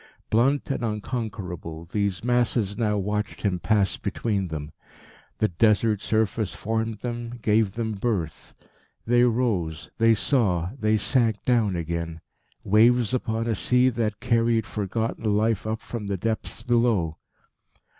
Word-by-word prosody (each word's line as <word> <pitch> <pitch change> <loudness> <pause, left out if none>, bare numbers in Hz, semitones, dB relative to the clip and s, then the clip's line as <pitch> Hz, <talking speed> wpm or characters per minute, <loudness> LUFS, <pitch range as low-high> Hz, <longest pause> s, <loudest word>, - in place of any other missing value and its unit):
Blunt 135 +6 +2
and 135 - -2
unconquerable, 105 -7 -4
these 100 +1 -2
masses 120 -4 +1
now 105 -2 0
watched 105 +2 -2
him 95 -4 0
pass 95 +3 +1
between 100 -5 -2
them. 75 -2 -6 0.7
The 110 - +2
Desert 105 +3 +2
surface 110 -4 0
formed 110 0 -2
them, 120 0 -5
gave 105 -2 +2
them 115 -1 -2
birth. 100 -7 -3 0.5
They 120 +1 +4
rose, 110 -10 -1
they 115 0 +5
saw, 100 - +1
they 110 -1 +2
sank 115 -1 +1
down 115 -6 +2
again 85 -1 -3 0.4
waves 120 +3 +4
upon 115 -2 -1
a 115 - 0
sea 125 +5 +3
that 110 -3 -2
carried 115 -2 +2
forgotten 110 +1 -1
life 110 -1 +1
up 110 0 -2
from 110 -4 -6
the 100 -1 -1
depths 110 +4 -3
below. 115 -10 +1
110 Hz, 135 wpm, -25 LUFS, 100-115 Hz, 0.7 s, they